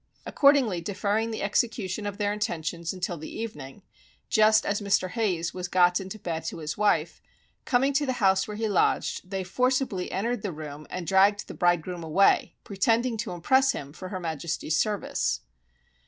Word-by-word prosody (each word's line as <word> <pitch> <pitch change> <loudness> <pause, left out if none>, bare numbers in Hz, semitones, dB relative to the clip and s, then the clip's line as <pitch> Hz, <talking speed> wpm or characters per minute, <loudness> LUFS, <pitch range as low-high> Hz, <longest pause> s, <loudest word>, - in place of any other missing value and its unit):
Accordingly 270 - +3
deferring 205 +4 -1
the 220 - -4
execution 205 -1 -1
of 200 -1 -5
their 205 -1 0
intentions 170 -5 -3
until 180 -2 -4
the 155 - -7
evening, 150 -12 -7 0.5
just 215 0 +4
as 205 +1 -1
Mr. 200 -2 +1
Hayes 185 -7 -1
was 180 -1 -4
got 180 0 +4
into 190 +2 -7
bed 165 -5 -4
to - - -4
his 155 -1 -4
wife, 210 0 +1 0.4
coming 270 +2 +2
to 285 +1 +1
the 260 - +1
house 190 -5 +2
where 210 -1 -6
he 220 0 -1
lodged, 185 -2 0
they 190 -1 -2
forcibly 250 -1 0
entered 235 +6 -1
the 205 - -3
room, 150 -1 -8
and 180 -1 -5
dragged 195 +4 +3
the - - -7
bridegroom 175 -1 0
away, 165 +5 +3
pretending 225 +5 +1
to 220 +1 -4
impress 260 +10 +3
him 140 0 -7
for 185 +3 -8
her 185 -1 -4
Majesty's 160 -1 -3
service. 200 - 0
195 Hz, 170 wpm, -27 LUFS, 175-220 Hz, 0.5 s, just